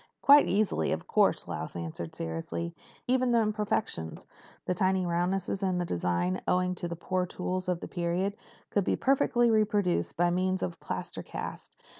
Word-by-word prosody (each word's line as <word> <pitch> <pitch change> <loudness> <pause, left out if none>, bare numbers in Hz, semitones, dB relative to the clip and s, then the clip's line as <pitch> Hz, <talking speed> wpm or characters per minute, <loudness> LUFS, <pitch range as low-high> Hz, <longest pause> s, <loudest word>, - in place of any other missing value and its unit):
"Quite 285 +1 +8
easily, 195 - +1
of - - -4
course," - - +2
Lausch - - -5
answered 85 -1 -5
seriously. 85 +1 -4 0.3
"Even 255 -1 +2
the 235 - +5
imperfections—the 210 - -3
tiny 185 +1 +1
roughnesses 180 +3 0
in 185 -2 +1
the 175 - 0
design, 90 - 0
owing 180 0 +2
to 175 -1 -3
the 170 - -4
poor 180 +2 -1
tools 185 +1 -3
of 175 -2 -1
the - - -5
period—could 185 +3 -2
be - - +1
perfectly 240 -3 +3
reproduced 210 -4 +1
by 175 +1 +3
means 185 +1 0
of 85 - -2
a - - -25
plaster - - -5
cast. - - -7
180 Hz, 160 wpm, -29 LUFS, 170-205 Hz, 0.3 s, Quite